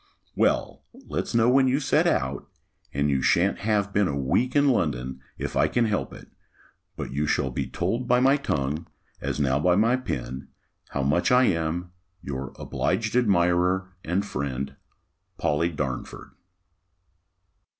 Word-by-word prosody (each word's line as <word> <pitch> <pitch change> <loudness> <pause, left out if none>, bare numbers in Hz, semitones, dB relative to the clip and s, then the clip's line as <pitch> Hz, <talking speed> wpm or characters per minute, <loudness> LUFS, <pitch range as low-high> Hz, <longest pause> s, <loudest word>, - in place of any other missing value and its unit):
Well, - - +1 0.2
let's - - -3
know 115 0 +4
when 130 +1 +5
you 130 +2 +2
set 135 - +2
out, 65 +1 -1 0.4
and 70 +1 0
you 70 -1 +1
shan't 90 +8 +2
have 100 -1 0
been 105 -2 +3
a 70 - -2
week 70 - 0
in 145 -1 +5
London, 65 - -1 0.2
if - - -4
I - - +4
can 120 -1 +1
help 105 -2 -1
it, - - -12 0.7
but - - -5
you 75 +3 -1
shall 65 - 0
be - - -3
told 115 +8 -2
by 125 0 +4
my 135 +2 +5
tongue, 75 - -2 0.3
as - - -2
now 65 -1 +2
by 90 +3 +3
my 115 +5 +3
pen, 65 - -5 0.4
how 70 - -2
much 75 - +2
I 125 +1 +6
am 85 -3 0 0.3
your 65 -1 -5
obliged 110 +4 -1
admirer 95 -4 +2
and 95 +5 -1
friend, 70 -4 -4 0.6
POLLY 85 +3 +1
DARNFORD. 70 -6 -5
90 Hz, 150 wpm, -25 LUFS, 70-115 Hz, 0.7 s, I